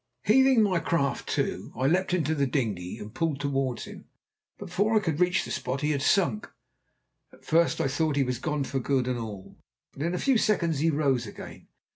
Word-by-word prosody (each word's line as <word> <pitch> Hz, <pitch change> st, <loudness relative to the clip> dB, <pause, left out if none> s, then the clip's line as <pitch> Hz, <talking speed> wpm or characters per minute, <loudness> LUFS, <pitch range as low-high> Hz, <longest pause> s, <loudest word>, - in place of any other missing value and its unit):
Heaving 260 Hz, +1 st, +5 dB
my 185 Hz, -4 st, +2 dB
craft 140 Hz, -6 st, -1 dB
to, -, -, -2 dB
I 130 Hz, -, -1 dB
leapt 180 Hz, +6 st, +2 dB
into 160 Hz, -4 st, +1 dB
the 140 Hz, -3 st, +1 dB
dinghy, 105 Hz, -10 st, -2 dB
and 105 Hz, +1 st, -9 dB
pulled 160 Hz, -4 st, -1 dB
towards 135 Hz, -3 st, -1 dB
him, -, -, -11 dB, 0.5 s
but -, -, -8 dB
before 205 Hz, +5 st, 0 dB
I -, -, +6 dB
could 165 Hz, -6 st, -2 dB
reach 180 Hz, +1 st, +2 dB
the -, -, -7 dB
spot 130 Hz, +1 st, -3 dB
he 150 Hz, +1 st, +1 dB
had 140 Hz, -2 st, -1 dB
sunk. 140 Hz, -, +1 dB, 0.8 s
At -, -, -20 dB
first 165 Hz, +1 st, +2 dB
I -, -, +1 dB
thought 150 Hz, +2 st, 0 dB
he 140 Hz, -, +3 dB
was 125 Hz, -2 st, -3 dB
gone 150 Hz, 0 st, -1 dB
for 135 Hz, 0 st, -2 dB
good 130 Hz, 0 st, 0 dB
and 125 Hz, -1 st, -1 dB
all, 105 Hz, -4 st, -8 dB, 0.3 s
but -, -, -10 dB
in 170 Hz, +3 st, -1 dB
a -, -, -1 dB
few 265 Hz, 0 st, +2 dB
seconds 170 Hz, -9 st, +1 dB
he 160 Hz, +3 st, +2 dB
rose 140 Hz, -6 st, +1 dB
again. -, -, -10 dB
145 Hz, 210 wpm, -27 LUFS, 130-175 Hz, 0.8 s, I